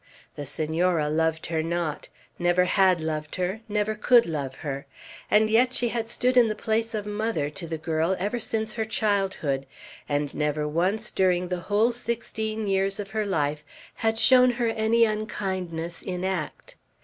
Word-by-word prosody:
The 145 -1 -6
Senora 160 +2 +1
loved 160 +1 0
her 160 -1 -1
not; 165 -2 -3 0.3
never 175 +1 +3
had 185 -2 +3
loved 155 -1 -3
her, 185 +4 -2
never 210 +1 0
could 235 +3 +5
love 140 -5 -4
her; 140 0 -4 0.4
and 215 +1 +5
yet 245 +4 +3
she 240 - +1
had 225 0 -2
stood 250 +2 +1
in 240 -2 +7
the 215 - -2
place 225 +1 -1
of 210 -1 -3
mother 210 -8 -2
to 170 +2 -6
the 160 0 -3
girl 160 +3 0
ever 210 +6 -2
since 220 -1 -1
her 225 - -1
childhood, 195 -11 -1 0.4
and 145 0 -1
never 150 0 -1
once 185 +8 0
during 180 -1 +1
the 180 -1 -2
whole 215 +4 +3
sixteen 220 -2 -3
years 195 0 +1
of 200 -1 -5
her 215 -1 -1
life 150 -5 -1 0.3
had 225 0 0
shown 255 +2 +6
her 240 -1 0
any 225 +1 +3
unkindness 190 -6 -3
in 180 -1 -4
act. 185 -5 -4
190 Hz, 170 wpm, -26 LUFS, 160-220 Hz, 0.4 s, in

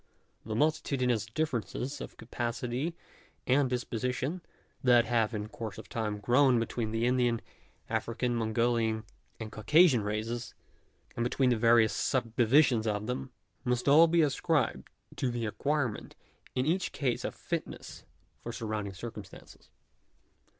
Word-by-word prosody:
The 110 0 -4
multitudinous 130 -6 +1
differences 135 +1 -3
of - - -8
capacity 120 +6 -3 0.5
and 130 +1 +3
disposition 125 +6 -2 0.4
that 120 -2 +5
have 115 -2 +1
in 105 0 -3
course 110 0 -7
of - - -10
time 105 -2 -2
grown 125 +5 +4
up - - +3
between 115 -1 -2
the 115 +1 0
Indian, 120 -2 +2 0.5
African, 115 +2 -1
Mongolian 115 -1 +1 0.4
and 110 -1 -6
Caucasian 150 +3 +4
races, 110 +3 -3 0.6
and 120 - -1
between 125 +1 +2
the - - +3
various 115 -1 +4
subdivisions 120 0 +2
of 105 0 -1
them, 125 +3 -3 0.3
must 125 -1 -1
all 155 +4 +8
be 165 0 +4
ascribed 150 0 0 0.3
to 130 - 0
the 120 -1 -2
acquirement 135 +1 -2 0.4
in 125 - +1
each 180 +4 0
case 130 -4 -1
of - - -4
fitness - - -5 0.4
for 120 - -5
surround 110 -3 -3
ing 100 - -7
circumstances. 105 -1 -10
120 Hz, 135 wpm, -30 LUFS, 110-130 Hz, 0.6 s, all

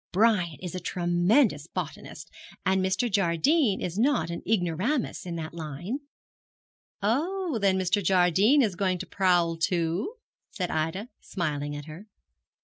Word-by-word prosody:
Brian 185 -5 +2
is 180 -3 -5
a 185 - -3
tremendous 175 - +2
botanist, 160 -2 -7 0.3
and 190 0 +2
Mr. 195 +6 +1
Jardine 200 - +2
is 180 +3 -3
not 230 - +2
an 170 - -5
ignoramus 205 - 0
in 170 - -4
that 160 -1 -5
line.' 170 - -5 1.0
'Oh, 315 - 0
then 195 -2 +3
Mr. 190 +2 +1
Jardine 190 - +4
is 210 -5 0
going 185 0 0
to 185 - -6
prowl 175 -3 +2
too?' 170 - -1 0.3
said 185 -4 -3
Ida, 165 +9 -2
smiling 145 -5 -3
at 145 0 -7
her. 165 +7 -10
185 Hz, 140 wpm, -27 LUFS, 170-215 Hz, 1.0 s, Jardine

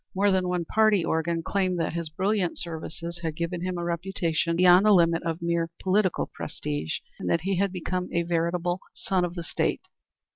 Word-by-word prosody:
More 200 +1 +3
than 185 -1 +2
one 180 -1 -1
party 215 -2 +3
organ 165 +1 0
claimed 185 -1 0
that 165 - -1
his 170 -2 -3
brilliant 190 +2 0
services 170 0 -5
had 160 -2 -3
given 170 +1 -3
him 180 0 -2
a 175 - -3
reputation 170 -1 -1
beyond 180 +2 +6
the 210 - +7
limit 170 -2 +4
of 165 0 -3
mere 170 -1 0
political 190 -1 +1
prestige, 75 +2 -4 0.2
and - - -3
that 165 - +2
he 190 +1 -1
had 200 0 +1
become 180 0 -3
a 170 - +1
veritable 175 +1 0
favorite - - -26
son 185 -2 0
of 175 0 -2
the 170 - -4
State. - - -1
175 Hz, 195 wpm, -26 LUFS, 165-185 Hz, 0.2 s, the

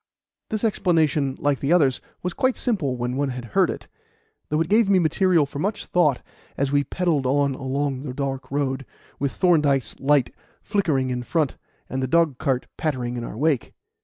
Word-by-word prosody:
This 215 0 -2
explanation, 160 -9 +2
like 145 -2 +1
the 140 - -1
others, 145 -8 +3 0.2
was 180 0 -2
quite 260 -2 +1
simple 165 - -1
when 120 +1 -2
one 140 0 0
had 125 -1 -5
heard - - +4
it, - - -6 0.6
though 150 - +1
it 165 - +1
gave 215 +1 +3
me 195 - +5
material 170 -1 +3
for 140 +1 -7
much 205 +7 -2
thought 155 -7 +2 0.3
as 140 0 0
we 145 0 +3
pedalled 160 -5 0
on 140 +1 +2
along 135 0 -2
the 135 -2 -5
dark 135 -1 -3
road, 135 -1 -1 0.4
with 140 -1 0
Thorndyke's 145 - +2
light 140 -2 +2 0.3
flickering 155 - 0
in 125 0 -2
front, 155 +2 0 0.3
and 130 - -3
the 130 - 0
dogcart 140 -4 +1
pattering 125 -6 -2
in 120 - -4
our 110 - -7
wake. 145 -2 0
145 Hz, 180 wpm, -23 LUFS, 130-170 Hz, 0.6 s, me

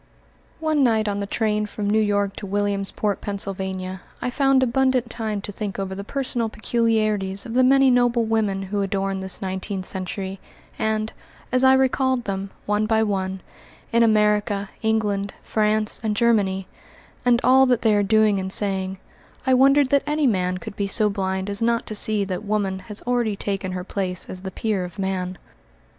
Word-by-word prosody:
One 310 -2 +1
night 220 -3 +2
on 205 0 -1
the 200 - -3
train 210 -1 0
from 210 0 -4
New 215 +2 +3
York 205 -1 0
to 200 - -6
Williamsport, 200 +1 -1
Pennsylvania, 190 -2 -4 0.2
I 250 - -2
found 270 -1 +3
abundant 255 -1 +1
time 215 -3 -2
to 205 - -6
think 205 -1 -5
over 195 -1 -3
the 200 +1 -5
personal 240 -1 0
peculiarities 215 -4 0
of 230 - -6
the 255 +1 +4
many 270 0 +5
noble 245 -1 +3
women 215 -3 0
who 200 +1 -2
adorn 195 0 -1
this 190 +1 -2
nineteenth 190 0 -4
century, 190 +1 -4 0.4
and, 220 0 -1 0.4
as 255 0 +2
I 260 0 +7
recalled 260 -1 +2
them, 195 -2 -3 0.2
one 210 +1 +1
by 220 0 +3
one, 190 -2 -2 0.5
in 235 - +4
America, 210 -2 +2
England, 210 -3 0
France, 215 0 0
and 215 -2 -1
Germany, 200 -5 +2 0.6
and 245 -1 +4
all 265 +1 +6
that 245 -3 +2
they 220 -2 +4
are 205 - +3
doing 210 0 +3
and 190 0 -4
saying, 190 -2 -1 0.5
I 260 - +3
wandered 275 +1 +5
that 280 0 +4
any 300 0 +1
man 185 -6 +1
could 180 - -8
be 200 - -1
so 210 +1 +3
blind 190 -1 -2
as 200 +1 -1
not 235 0 +1
to - - -5
see 210 0 0
that 190 0 -4
woman 200 -2 -1
has 210 - -6
already 240 -4 0
taken 195 -2 -3
her 180 -1 -4
place 185 -2 -3
as 185 - -6
the 190 - -5
peer 200 0 -2
of 180 +3 -8
man. 185 -2 -2
210 Hz, 180 wpm, -23 LUFS, 195-230 Hz, 0.6 s, I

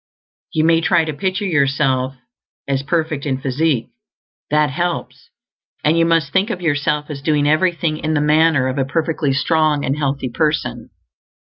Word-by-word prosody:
You 155 - +1
may 165 0 +4
TRY 165 0 +2
to 155 - -3
picture 190 +7 -2
yourself 135 -5 +1 0.5
as 135 -1 0
perfect 155 -1 -2
in 130 -2 -1
physique; 135 -1 0 0.6
that 150 -1 +2
helps; 175 +5 -4 0.5
and 155 +2 +3
you 165 0 +3
MUST 165 -4 +1
think 190 +4 +2
of 185 - -3
yourself 150 -2 -1
as 140 -2 -6
doing 145 0 +1
everything 160 0 +1
in 155 0 -2
the - - +2
manner 150 -2 +3
of 130 +1 -2
a 135 - +1
perfectly 155 0 -1
strong 150 +1 +1
and 135 - 0
healthy 140 -3 -2
person. 120 -4 -2
150 Hz, 165 wpm, -19 LUFS, 140-165 Hz, 0.6 s, may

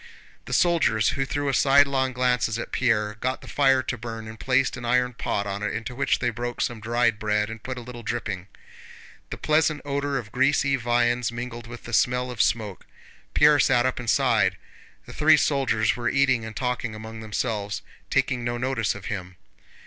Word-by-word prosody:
The 125 - -9
soldiers, 160 - +3
who 135 -1 -1
threw 145 0 -1
sidelong 135 -1 +4
glances 125 -3 +1
at 120 - -6
Pierre, 105 -4 0
got 130 +2 -2
the - - -12
fire 135 -2 +3
to 125 - -3
burn 115 -1 -6
and 110 0 -10
placed 130 0 +1
an 125 - -8
iron 125 +1 +1
pot 100 -3 -2
on 100 0 -4
it 105 - -2
into 115 +2 -5
which 140 +3 +1
they 120 -1 -1
broke 120 +1 -5
some 120 -2 -1
dried 115 0 +1
bread 105 0 0
and 115 -1 -8
put 130 +1 -5
a - - -5
little 120 0 -9
dripping. 105 -5 -4 0.8
The - - -6
pleasant 155 0 +2
odor 140 0 -1
of 110 -4 -6
greasy 140 +2 +2
viands 120 -1 +1
mingled 120 0 -6
with 120 0 -10
the 120 - -9
smell 125 +3 +2
of 115 -3 -1
smoke. 105 -4 -1 0.5
Pierre 150 0 +6
sat 125 -1 +3
up 130 - -1
and 120 -2 -4
sighed. - - +2 0.5
The - - -11
three 155 +1 +5
soldiers 130 -8 +1
were 120 0 -1
eating 130 -4 +2
and 110 -1 -8
talking 125 -3 -2
among 110 +1 -8
themselves, 105 -1 -3 0.3
taking 125 -2 0
no 120 0 -2
notice 120 -4 -1
of 100 - -9
him. 90 -3 -5
120 Hz, 190 wpm, -25 LUFS, 110-130 Hz, 0.8 s, Pierre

